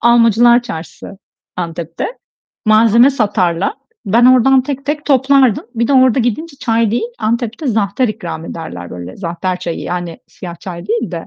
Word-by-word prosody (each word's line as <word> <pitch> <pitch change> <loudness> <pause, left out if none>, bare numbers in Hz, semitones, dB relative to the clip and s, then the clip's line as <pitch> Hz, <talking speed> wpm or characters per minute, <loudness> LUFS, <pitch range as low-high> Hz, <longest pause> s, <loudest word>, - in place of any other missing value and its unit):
Almacılar 235 0 +5
Çarşısı, 195 -2 -9 0.4
Antep'te. 170 -1 -4 0.6
Malzeme 225 +4 +5
satarlar. 195 -8 0 0.3
Ben 230 +5 +3
oradan 255 +1 +5
tek 275 0 -5
tek 295 +1 -3
toplardım. 265 -4 +3
Bir 235 0 0
de - - +2
orada 260 -2 +4
gidince 280 +6 -2
çay 225 -3 0
değil, 230 0 -1
Antep'te 235 +5 -2
zahter 220 +1 0
ikram 175 -6 -6
ederler 160 - -7
böyle, 90 +1 -8
zahter 180 0 -3
çayı, 175 -2 -4
yani 175 -2 -5
siyah 175 -2 -9
çay 175 -1 -8
değil 230 -1 -1
de. 170 -2 -6
225 Hz, 150 wpm, -15 LUFS, 175-245 Hz, 0.6 s, Almacılar